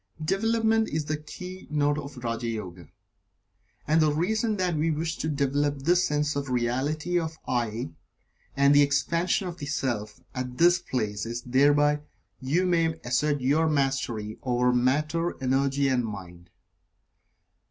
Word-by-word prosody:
Development 225 +4 +2
is 155 -1 -2
the 155 +1 -2
keynote 150 -2 -3
of 140 -2 -8
Raja 115 0 -2
Yoga. 90 -7 -6 1.0
And 155 +2 +4
the 155 -1 +4
reason 215 +8 0
that 180 -3 0
we 155 +2 +1
wish 160 +1 -1
to 155 - -1
develop 140 0 0
this 175 +4 +3
sense 150 0 0
of 140 0 -2
the 130 - -2
Reality 145 +8 0
of 160 -1 -3
the - - -4
"I," 115 -5 -1 0.7
and 140 +1 +5
the 145 - +7
Expansion 170 +6 +1
of 175 0 -7
the 145 - -5
Self, 120 -7 -2
at 125 -1 -5
this 175 +3 +5
place 110 -3 -3
is 120 +1 -4
that 125 - -11
thereby 145 +2 +4 0.4
you 155 +8 +1
may 165 -3 +2
assert 145 +4 0
your 150 +5 +2
Mastery 135 -7 -1
over 125 0 +1
Matter, 150 +7 +1
Energy 135 +1 +1
and 130 -2 +2
Mind. 90 -5 -8
145 Hz, 150 wpm, -27 LUFS, 125-160 Hz, 1.0 s, the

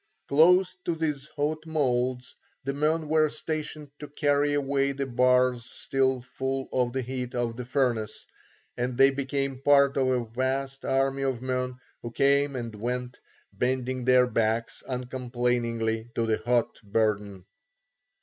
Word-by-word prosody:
Close 180 +5 +5
to 170 - -1
these 150 -3 -2
hot 155 +1 -1
moulds 125 -4 -1 0.3
the 140 +1 -2
men 155 +2 0
were 155 0 +3
stationed 155 -1 -5
to 150 - -7
carry 145 0 +1
away 140 -1 +1
the 140 0 -2
bars 125 -1 +3
still 130 -1 0
full 135 +1 -3
of 125 -1 +1
the 130 +1 -2
heat 125 0 -4
of 120 -1 -1
the 125 - -5
furnace, 120 -5 -1 0.5
and 125 0 -2
they 135 +1 +6
became 135 -1 -2
part 140 -1 +4
of 130 -1 +2
a 125 -2 +1
vast 135 +3 -2
army 135 +1 +1
of 130 -3 -1
men 125 -1 -2 0.3
who 120 - -5
came 140 +2 +2
and 115 -3 -4
went, 125 +3 -4 0.3
bending 130 0 -1
their 125 0 +5
backs 115 -1 -1
uncomplainingly 120 -3 -2
to 115 - +1
the 110 -1 0
hot 120 -1 +1
burden. 105 -3 -1
130 Hz, 145 wpm, -27 LUFS, 120-140 Hz, 0.5 s, they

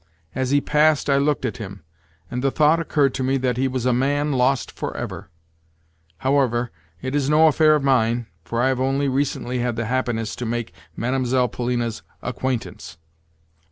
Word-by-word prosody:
As 130 0 -1
he 145 +1 +3
passed 150 -1 +3
I 140 - +4
looked 140 -1 +1
at 110 - -3
him, 100 -5 -8 0.5
and 125 +1 -3
the 135 - +3
thought 150 +4 +3
occurred 145 -4 +1
to 130 - -2
me 135 +1 +1
that 125 -2 -1
he 135 +1 +1
was 130 -2 -3
a 125 - +3
man 145 +4 +1
lost 130 -1 +1
for - - -5
ever. - - -6 0.9
However, 125 -2 +1 0.3
it 130 +1 -3
is 145 -1 +1
no 155 +1 +5
affair 155 0 +5
of 150 - -1
mine, 120 -3 +2 0.2
for 115 +6 -1
I 130 - +3
have 130 -1 0
only 135 +2 +1
recently 130 -2 -1
had 120 -1 -1
the 115 0 -2
happiness 120 -2 -1
to 125 - -4
make 120 0 -3 0.2
Mlle. 125 0 +1
Polina's 120 -1 -2 0.2
acquaintance. 125 -7 -4
130 Hz, 180 wpm, -22 LUFS, 120-140 Hz, 0.9 s, no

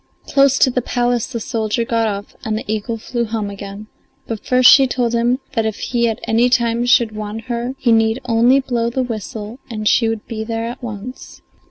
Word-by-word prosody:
Close 275 -1 +3
to 260 - +4
the 250 - 0
palace 245 -1 0
the 235 - -5
soldier 225 0 -1
got 230 -2 +1
off 205 0 -5
and 215 -1 -1
the - - -6
eagle 220 +2 -3
flew 235 +2 -3
home 215 -2 -3
again, 200 +1 -8 0.4
but 225 -2 -5
first 255 0 +4
she 270 0 +8
told 245 -2 -1
him 240 +2 +2 0.2
that 225 - +1
if 220 -1 -2
he 235 -1 0
at 225 +1 -3
any 230 +2 +2
time 235 -1 +1
should 235 -2 +4
want 215 +1 -5
her 240 +2 -4
he 245 -3 +1
need 225 +1 +3
only 240 +3 +4
blow 240 -3 -1
the 255 +2 -1
whistle 225 0 -6
and 215 -2 -3
she 230 +1 +3
would 225 -2 -4
be 220 -2 -5
there 225 0 -3
at 235 +1 -6
once. 240 +2 -8
230 Hz, 210 wpm, -18 LUFS, 220-245 Hz, 0.4 s, she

